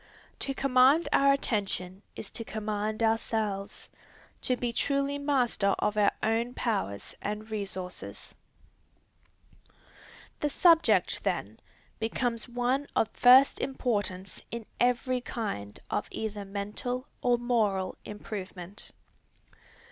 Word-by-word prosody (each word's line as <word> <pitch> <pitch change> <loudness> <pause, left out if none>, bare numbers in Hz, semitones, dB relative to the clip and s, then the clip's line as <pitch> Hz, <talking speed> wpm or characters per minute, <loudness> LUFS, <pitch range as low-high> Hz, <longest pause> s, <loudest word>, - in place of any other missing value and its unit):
To 275 - -1
command 270 +4 +4
our 275 0 +6
attention 200 -8 -1
is 205 - -6
to 230 - -3
command 215 0 -2
ourselves, 220 -3 -1 0.5
to 255 - 0
be 240 -1 -2
truly 280 +2 0
master 250 -8 +2
of 210 - 0
our 210 -1 +4
own 230 +3 0
powers 195 - -2
and 210 +2 -4
resources. 190 -4 -4 2.1
The 295 - 0
subject, 335 +2 +4
then, - - -2 0.4
becomes 230 +1 -1
one 250 +4 0
of 225 - +2
first 255 +2 +7
importance 205 -8 -2
in 235 -1 -5
every 250 +1 +2
kind 200 - -4
of - - -1
either 210 -2 -4
mental 210 +6 -3 0.2
or 245 -1 +3
moral 215 -6 0
improvement. 200 -2 -7
225 Hz, 105 wpm, -29 LUFS, 205-250 Hz, 2.1 s, first